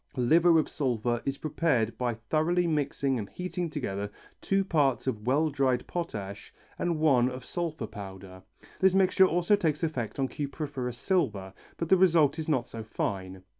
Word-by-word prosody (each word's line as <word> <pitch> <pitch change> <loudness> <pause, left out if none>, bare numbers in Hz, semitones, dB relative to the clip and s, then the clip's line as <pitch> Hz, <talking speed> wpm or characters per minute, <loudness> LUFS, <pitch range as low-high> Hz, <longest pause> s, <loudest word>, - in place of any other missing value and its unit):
Liver 165 +7 +5
of 155 - +2
sulphur 120 -4 -1
is 135 0 -2
prepared 140 -7 0
by 120 -2 -1
thoroughly 155 +10 0
mixing 140 -4 0
and 100 - -6
heating 180 -1 -4
together 100 -9 -3 0.3
two 195 0 +1
parts 140 - +1
of 110 -4 -3
well 150 +4 +2
dried 135 -3 +1
potash 105 - -5 0.3
and 170 -2 0
one 135 -6 +4
of 130 0 -8
sulphur 165 -8 -3
powder. 95 -3 -9 0.4
This 190 0 +4
mixture 190 0 +5
also 175 +4 +3
takes 165 -4 -1
effect 130 -9 -2
on 135 -1 +1
cupriferous 140 -4 -4
silver, 110 - -1 0.2
but 165 - -3
the 190 - +6
result 165 -5 +4
is 160 - -4
not 130 -6 +1
so 115 -1 -8
fine. 95 -4 -4
140 Hz, 165 wpm, -28 LUFS, 115-165 Hz, 0.4 s, the